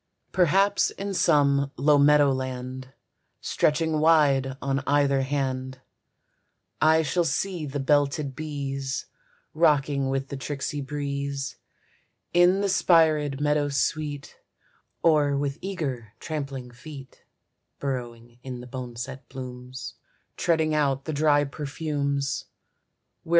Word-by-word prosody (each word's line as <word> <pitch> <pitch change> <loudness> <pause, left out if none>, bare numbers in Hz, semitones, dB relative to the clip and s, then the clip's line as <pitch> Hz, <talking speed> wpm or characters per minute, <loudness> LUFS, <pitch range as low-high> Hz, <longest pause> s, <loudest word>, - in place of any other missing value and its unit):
Perhaps 195 +3 +3
in 200 0 -5
some 140 -5 +3
low 145 +2 +4
meadow 145 0 +5
land, 130 0 -4 0.5
Stretching 155 +1 +1
wide 140 -4 +3
on 135 0 -1
either 140 -1 +3
hand, 130 -1 -2 1.0
I 160 +1 +5
shall 175 +4 +1
see 165 +1 -2
the 145 +1 -4
belted 140 0 +1
bees 140 -3 -4 0.5
Rocking 145 -4 +2
with 135 0 -2
the 140 - -5
tricksy 145 +1 -4
breeze 140 0 -4 0.8
In 175 +3 +5
the 200 - +1
spirèd 155 -6 +3
meadow 145 0 +1
sweet, 145 0 -2 0.7
Or 150 -4 +4
with 140 +1 -2
eager 135 - -4
trampling 135 -5 -5
feet 135 +2 -12 0.5
Burrowing 120 -3 -5
in 125 -1 -6
the 125 - -9
boneset 125 +1 -7
blooms, 125 -1 -8 0.4
Treading 160 -3 +1
out 140 -3 +1
the 155 - -3
dry 145 0 +3
perfumes. 140 -2 -2
140 Hz, 110 wpm, -26 LUFS, 135-155 Hz, 1.0 s, meadow